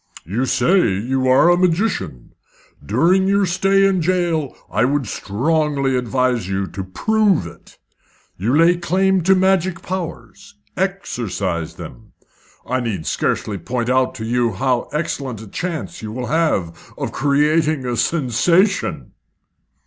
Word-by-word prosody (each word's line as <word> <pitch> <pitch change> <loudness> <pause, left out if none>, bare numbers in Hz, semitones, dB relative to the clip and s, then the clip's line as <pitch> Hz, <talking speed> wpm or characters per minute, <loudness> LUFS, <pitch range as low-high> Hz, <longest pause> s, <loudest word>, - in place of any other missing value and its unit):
You 115 - -2
say 125 - +2
you 130 +5 -1
are 130 +7 +5
a - - +5
magician. 180 - -1 0.5
During 170 - +2
your 200 0 +3
stay 195 +2 +2
in 190 -2 +2
jail 170 -4 0 0.2
I 105 - +1
would 140 +1 +1
strongly 140 +6 0
advise 125 -4 0
you 95 0 -1
to 95 +1 -6
prove 205 - +1
it. 85 - -13 0.6
You 115 +10 0
lay 170 +2 +5
claim 190 +2 +1
to 190 +3 +4
magic 190 -2 +1
powers. 190 +2 -6 0.2
Exercise 100 - -3
them. - - -11 0.5
I 130 +1 -1
need 105 -10 -3
scarcely 100 -3 -1
point 120 +7 -2
out 130 0 +1
to 110 -3 -6
you 120 -1 0
how 125 +4 -1
excellent 140 -6 -3
a 110 - -10
chance 170 - -5
you 110 -1 -6
will 125 +2 -4
have 100 - -1
of - - -3
creating 150 +1 +1
a 120 -1 -1
sensation." 165 - +1
140 Hz, 135 wpm, -19 LUFS, 115-180 Hz, 0.6 s, are